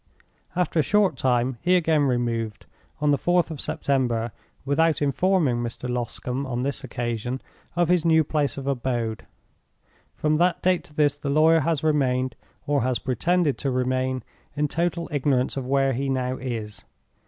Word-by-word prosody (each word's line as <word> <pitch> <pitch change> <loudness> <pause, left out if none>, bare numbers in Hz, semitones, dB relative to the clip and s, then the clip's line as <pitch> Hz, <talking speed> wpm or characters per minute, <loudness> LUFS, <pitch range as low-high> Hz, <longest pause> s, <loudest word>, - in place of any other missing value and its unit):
After 175 -2 +1
a - - +6
short 200 -1 +2
time 125 -1 0
he 180 +2 +3
again 160 -4 +3
removed, 120 -4 -1 0.4
on 150 -1 +3
the 140 - +2
4th 175 -2 +2
of 150 - -5
September, 120 -4 0 0.3
without 160 +3 +2
informing 150 -1 +2
Mr. 120 +1 -4
Loscombe, 125 +2 -3
on 125 -1 -2
this 140 +1 -2
occasion, 120 0 -3 0.4
of 175 -1 +2
his 175 -1 +3
new 160 -1 +4
place 145 -2 -1
of 135 - -5
abode. 120 -4 -2 0.9
From 155 0 +1
that 175 +2 +1
date 185 -1 +2
to 150 - -16
this 145 -1 +2
the 140 - -3
lawyer 160 +3 +5
has 160 0 0
remained 130 -5 +1 0.3
(or 145 -1 +1
has 125 0 +1
pretended 160 +4 0
to 140 - 0
remain) 130 0 0 0.3
in 150 0 +1
total 170 +2 -1
ignorance 135 -3 +1
of 135 -2 -4
where 135 0 +2
he 135 +2 -2
now 130 -1 -1
is. 115 -5 -5
140 Hz, 165 wpm, -24 LUFS, 125-155 Hz, 0.9 s, a